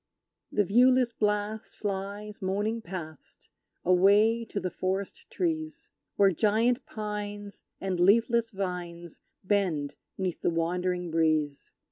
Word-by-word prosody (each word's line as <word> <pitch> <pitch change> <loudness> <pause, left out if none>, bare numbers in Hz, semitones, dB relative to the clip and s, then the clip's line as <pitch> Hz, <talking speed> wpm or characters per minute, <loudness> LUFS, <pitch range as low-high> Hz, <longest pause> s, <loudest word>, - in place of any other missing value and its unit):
The 205 - +2
viewless 245 +4 +4
blast 210 0 -1
flies 205 +1 -5
moaning 205 +4 -1
past, 170 -5 -9 0.4
Away 205 +6 +5
to 210 - -4
the 185 - -3
forest 190 +1 -3
trees; 315 -3 -3 0.2
Where 200 -1 +5
giant 225 - +1
pines 205 -1 -5 0.2
and 190 -2 -2
leafless 230 +5 +4
vines 175 -4 -5 0.2
Bend 185 -8 0 0.2
'neath 185 -3 -3
the - - +2
wandering 175 +1 -1
breeze! 155 -3 0
200 Hz, 110 wpm, -28 LUFS, 180-215 Hz, 0.4 s, Away